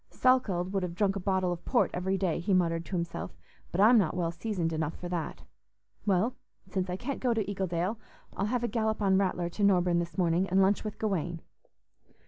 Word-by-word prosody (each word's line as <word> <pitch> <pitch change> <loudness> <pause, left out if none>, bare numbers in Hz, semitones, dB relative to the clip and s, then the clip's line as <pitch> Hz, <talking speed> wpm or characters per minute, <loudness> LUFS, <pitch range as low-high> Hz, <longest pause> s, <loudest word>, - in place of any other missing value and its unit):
"Salkeld 200 -9 +2
would 195 - +1
have 175 -2 -4
drunk 195 0 +1
a - - -2
bottle 190 -1 0
of 175 0 -5
port 245 - +2
every 190 +2 0
day," 185 -4 0
he 185 +3 +1
muttered 165 -2 +1
to 190 - -4
himself, 170 -1 -4 0.3
"but 175 - -2
I'm 225 +3 +7
not 175 -4 0
well 170 -2 0
seasoned 170 -2 -2
enough 160 0 -2
for 180 - -6
that. 175 -2 -4 0.6
Well, 200 +6 +2 0.3
since 185 -1 -2
I 180 - -1
can't 265 +6 -4
go 245 -3 +1
to 220 -3 0
Eagledale, 190 +1 -1 0.4
I'll 195 - -1
have 245 +1 -1
a - - +1
gallop 220 -1 0
on 190 -1 +4
Rattler 180 -3 0
to 190 +4 -3
Norburne 180 -3 +4
this 170 +2 -4
morning, 180 +1 +2
and 190 +2 +3
lunch 195 +1 +3
with 215 -1 -5
Gawaine." 175 -5 -2
190 Hz, 210 wpm, -29 LUFS, 175-205 Hz, 0.6 s, I'm